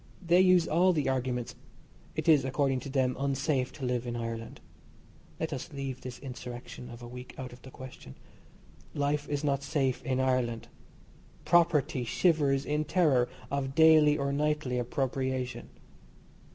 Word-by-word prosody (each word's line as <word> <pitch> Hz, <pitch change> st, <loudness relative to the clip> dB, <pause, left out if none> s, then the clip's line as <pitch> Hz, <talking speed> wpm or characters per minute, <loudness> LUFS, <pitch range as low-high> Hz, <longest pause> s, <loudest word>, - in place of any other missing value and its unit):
They 175 Hz, 0 st, +4 dB
use 180 Hz, -2 st, +5 dB
all 180 Hz, +3 st, +4 dB
the 150 Hz, -4 st, 0 dB
arguments. 125 Hz, -2 st, -2 dB, 0.6 s
It -, -, -3 dB
is, 150 Hz, -5 st, +6 dB
according 135 Hz, 0 st, 0 dB
to 135 Hz, -, -8 dB
them, 130 Hz, -2 st, +1 dB
unsafe 135 Hz, -1 st, 0 dB
to 135 Hz, -, -6 dB
live 125 Hz, -1 st, -1 dB
in 120 Hz, -, -3 dB
Ireland. 115 Hz, -1 st, -5 dB, 0.8 s
(Let 160 Hz, -1 st, -2 dB
us 135 Hz, +5 st, -6 dB
leave 135 Hz, -3 st, -5 dB
this 125 Hz, -1 st, -7 dB
insurrection 125 Hz, -1 st, -8 dB
of 120 Hz, 0 st, -10 dB
a -, -, -7 dB
week 125 Hz, +1 st, -10 dB
out 130 Hz, -2 st, -7 dB
of 125 Hz, -, -14 dB
the 130 Hz, -, -11 dB
question.) 130 Hz, -, -11 dB, 0.8 s
Life 145 Hz, 0 st, 0 dB
is 145 Hz, 0 st, -2 dB
not 140 Hz, -2 st, +1 dB
safe 140 Hz, -3 st, 0 dB
in 130 Hz, -1 st, -1 dB
Ireland. 125 Hz, -3 st, 0 dB, 0.8 s
Property 165 Hz, -7 st, +3 dB
shivers 140 Hz, 0 st, +2 dB
in 150 Hz, +1 st, 0 dB
terror 150 Hz, -7 st, +2 dB, 0.2 s
of 135 Hz, -1 st, -2 dB
daily 155 Hz, -2 st, +6 dB
or 140 Hz, -1 st, -1 dB
nightly 150 Hz, -3 st, 0 dB
appropriation. 130 Hz, +1 st, -2 dB
135 Hz, 150 wpm, -30 LUFS, 125-150 Hz, 0.8 s, is